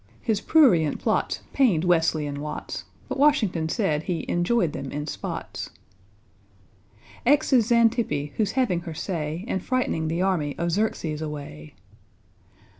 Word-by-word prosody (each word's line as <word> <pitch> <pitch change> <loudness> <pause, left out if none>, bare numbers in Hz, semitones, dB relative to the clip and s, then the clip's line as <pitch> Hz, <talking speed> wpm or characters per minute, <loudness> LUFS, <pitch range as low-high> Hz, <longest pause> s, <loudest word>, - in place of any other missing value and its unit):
His 215 -3 -1
prurient 200 - +4
plots - - -1
pained 215 - +3
=W=esley 165 -4 +2
and 145 0 -4
=W=atts, 150 +1 -5 0.2
But - - -4
=W=ashington 215 - +3
said 160 -8 0
he 165 -1 -3
"enjoyed 175 -1 +1
them 135 - -5
in 150 +1 -4
spots." - - -5 1.5
=X= 280 +2 +3
is 240 -2 +4
=X=antippe, 225 - +2
who's 210 -3 0
having 245 -10 +1
her 170 -2 -7
say, 165 +1 -3
And 190 -7 -2
frightening 250 -11 0
the 170 +3 0
army 160 -7 0
of 170 0 0
=X=erxes 165 -8 -1
away. 140 - -7
175 Hz, 135 wpm, -25 LUFS, 150-225 Hz, 1.5 s, prurient